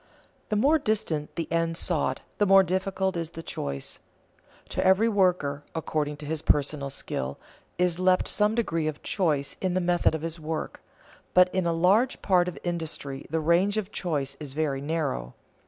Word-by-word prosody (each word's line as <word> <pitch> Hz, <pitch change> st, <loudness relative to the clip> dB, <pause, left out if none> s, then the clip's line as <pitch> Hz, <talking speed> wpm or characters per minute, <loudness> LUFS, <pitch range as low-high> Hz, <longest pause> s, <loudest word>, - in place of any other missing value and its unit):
The 215 Hz, -, 0 dB
more 285 Hz, +9 st, +4 dB
distant 185 Hz, -, -1 dB
the 165 Hz, -, -2 dB
end 165 Hz, 0 st, 0 dB
sought, 150 Hz, -8 st, 0 dB, 0.2 s
the 205 Hz, -, +3 dB
more 195 Hz, 0 st, +7 dB
difficult 190 Hz, +1 st, -1 dB
is 165 Hz, -2 st, -3 dB
the 165 Hz, -, -5 dB
choice. 70 Hz, -, -4 dB, 0.7 s
To -, -, -1 dB
every 190 Hz, +4 st, +5 dB
worker, 180 Hz, -9 st, +1 dB
according 150 Hz, -2 st, -2 dB
to 150 Hz, -, -9 dB
his 155 Hz, 0 st, -3 dB
personal 145 Hz, -2 st, +1 dB
skill, 70 Hz, -, -4 dB, 0.4 s
is 180 Hz, -1 st, +1 dB
left 185 Hz, 0 st, +3 dB
some 210 Hz, +1 st, +2 dB
degree 165 Hz, -9 st, 0 dB
of 155 Hz, -1 st, -4 dB
choice 150 Hz, -8 st, 0 dB
in 185 Hz, -2 st, 0 dB
the -, -, +3 dB
method 175 Hz, -2 st, +2 dB
of 160 Hz, -, -5 dB
his 165 Hz, 0 st, -3 dB
work, 160 Hz, 0 st, -4 dB, 0.5 s
but 180 Hz, 0 st, +6 dB
in 185 Hz, -2 st, +1 dB
a -, -, +2 dB
large 195 Hz, +10 st, +3 dB
part 180 Hz, -3 st, +3 dB
of 180 Hz, -, -5 dB
industry 160 Hz, -5 st, -4 dB
the 160 Hz, +2 st, 0 dB
range 175 Hz, +6 st, +2 dB
of 210 Hz, -1 st, -2 dB
choice 145 Hz, -9 st, -2 dB
is 145 Hz, -3 st, -6 dB
very 145 Hz, -3 st, -1 dB
narrow. 145 Hz, -, -2 dB
165 Hz, 175 wpm, -27 LUFS, 150-185 Hz, 0.7 s, more